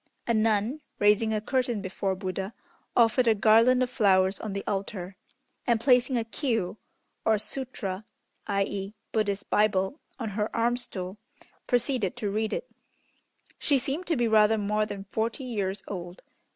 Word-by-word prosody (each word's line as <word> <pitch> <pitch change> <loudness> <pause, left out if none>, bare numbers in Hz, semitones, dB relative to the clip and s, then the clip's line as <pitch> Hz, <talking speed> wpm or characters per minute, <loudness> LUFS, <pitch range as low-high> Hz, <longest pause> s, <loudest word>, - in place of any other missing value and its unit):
A 235 - +1
nun, 220 +5 +1 0.2
raising 210 +2 +4
a 215 - +1
curtain 245 0 0
before 190 0 -2
Buddha, 190 +2 -4 0.4
offered 235 +1 +4
a 225 - +5
garland 230 +4 +5
of 250 - -1
flowers 190 -5 +3
on 215 -3 -4
the 200 - -3
altar, 195 -2 -3 0.5
and 235 -2 +3
placing 250 +1 +4
a 230 - +1
Kiô 225 - -2 0.5
(or 220 -1 +3
Sutra, 215 -3 -4 0.4
i.e., 200 0 -1 0.2
Buddhist 205 -2 -1
Bible) 210 +5 +2 0.2
on 230 -4 -3
her 210 +1 -1
"arm 235 +1 +2
stool," 190 -5 -5 0.5
proceeded 245 -3 +1
to 215 -5 -2
read 215 +1 -1
it. - - -3 0.9
She 285 - +3
seemed 280 +7 -3
to 330 - +2
be 240 -1 +2
rather 220 0 +5
more 210 +1 0
than 200 -2 -6
forty 225 +6 -2
years 200 -5 -2
old. 180 -2 -7
215 Hz, 150 wpm, -28 LUFS, 200-240 Hz, 0.9 s, a